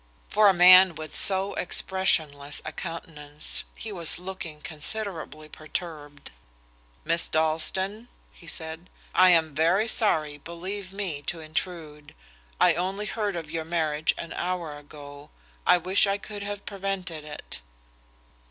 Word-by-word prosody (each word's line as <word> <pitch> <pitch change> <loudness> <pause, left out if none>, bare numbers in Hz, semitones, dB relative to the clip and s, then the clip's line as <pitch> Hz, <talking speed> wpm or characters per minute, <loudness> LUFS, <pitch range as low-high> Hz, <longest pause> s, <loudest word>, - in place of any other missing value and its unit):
For 215 -1 +4
a - - +8
man 185 0 +8
with 155 0 -8
so 195 0 +6
expressionless 155 -6 0
a 155 - -4
countenance, 155 -4 -5
he 220 - -7
was 170 -5 +3
looking 175 -4 -8
considerably 160 -1 -5
perturbed. 155 -2 -7 0.7
"Miss 165 +1 +2
Dalstan," 175 +8 0 0.3
he 170 - -17
said, 160 +2 -5 0.2
"I 185 0 +6
am 160 -3 +3
very 170 +8 +2
sorry, 155 -10 +2
believe 185 +5 -7
me, 190 -7 -4
to 170 - -2
intrude. 155 -2 -6 0.4
I - - +5
only 190 +4 -3
heard 210 -3 -2
of 160 -3 -6
your 165 -1 -3
marriage 160 -2 0
an 170 - -7
hour 175 -4 -3
ago. 145 -1 -12 0.4
I - - +7
wish 185 +4 +3
I 200 0 0
could 205 0 -8
have 205 0 -6
prevented 195 -5 -4
it." 150 - -6
170 Hz, 135 wpm, -26 LUFS, 155-190 Hz, 0.7 s, a